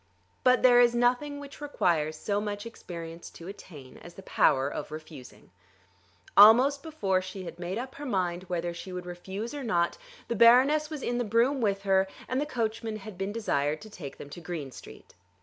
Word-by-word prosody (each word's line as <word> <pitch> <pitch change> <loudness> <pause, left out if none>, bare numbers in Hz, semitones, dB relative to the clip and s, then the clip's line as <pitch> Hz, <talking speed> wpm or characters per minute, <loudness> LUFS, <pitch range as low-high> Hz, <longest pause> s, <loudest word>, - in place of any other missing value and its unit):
But 255 0 +4
there 245 -1 +7
is 240 0 +4
nothing 250 +4 +1
which 285 +1 -11
requires 160 - 0
so 205 +5 -1
much 205 0 -4
experience 170 -6 -8
to 170 - -12
attain 150 -9 -11
as 175 - -13
the 195 - -11
power 135 -6 +3
of 145 - -5
refusing. 150 -8 -11 0.8
Almost 250 +7 +7
before 200 -13 -1
she 185 +1 -7
had 175 - -9
made 180 +3 -4
up 255 +2 -5
her 290 - -8
mind 185 -4 -1
whether 175 -1 -2
she 170 +2 -8
would 180 -1 -6
refuse 190 +7 -6
or 290 -2 -5
not 175 -7 0 0.3
the 235 - -2
Baroness 260 +7 +5
was 305 -4 -6
in 240 0 -1
the - - +1
brougham 235 +5 +2
with 200 -3 0
her, 190 -1 +3 0.2
and 255 +2 -1
the 295 - -2
coachman 225 -4 -2
had 215 -1 -10
been 195 +2 -3
desired 155 -9 -1
to 215 - -12
take 150 -9 -9
them 145 - -10
to 175 - -9
Green 160 -5 -5
Street. - - -13
200 Hz, 195 wpm, -28 LUFS, 175-245 Hz, 0.8 s, there